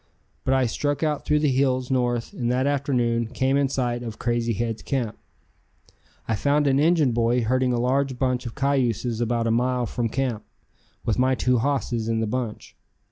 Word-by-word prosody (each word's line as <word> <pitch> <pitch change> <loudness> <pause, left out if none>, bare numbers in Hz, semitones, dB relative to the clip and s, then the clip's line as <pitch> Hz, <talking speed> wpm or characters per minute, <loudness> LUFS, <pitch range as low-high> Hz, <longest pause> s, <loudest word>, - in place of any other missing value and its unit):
But 135 - +3
I 130 -1 +3
struck 145 +5 -1
out 150 -2 -1
through 150 0 +2
the 150 -3 +2
hills 130 -1 +1
north, 120 -2 0
and 120 -2 -1
that 130 +2 +1
afternoon 125 -5 0
came 130 +3 0
in 140 -1 +2
sight 120 -3 -1
of 115 -3 -6
Crazy 120 -1 0
Head's 115 +1 -3
camp. 125 -6 -2 1.1
I - - 0
found 145 +7 +2
an 135 -1 +3
Injun 155 -3 +3
boy 120 +1 +1
herding 130 +2 +1
a 120 - 0
large 130 +1 0
bunch 125 -1 0
of 115 - -8
cayuses 125 -4 0
about 120 0 0
a 115 - +1
mile 125 +1 +1
from 115 +1 -2
camp, 125 -4 -2 0.6
with 115 +1 0
my 130 +1 +3
two 125 0 +2
hosses 125 -4 -1
in 115 -1 0
the 110 - 0
bunch. 115 0 -4
125 Hz, 190 wpm, -24 LUFS, 115-135 Hz, 1.1 s, But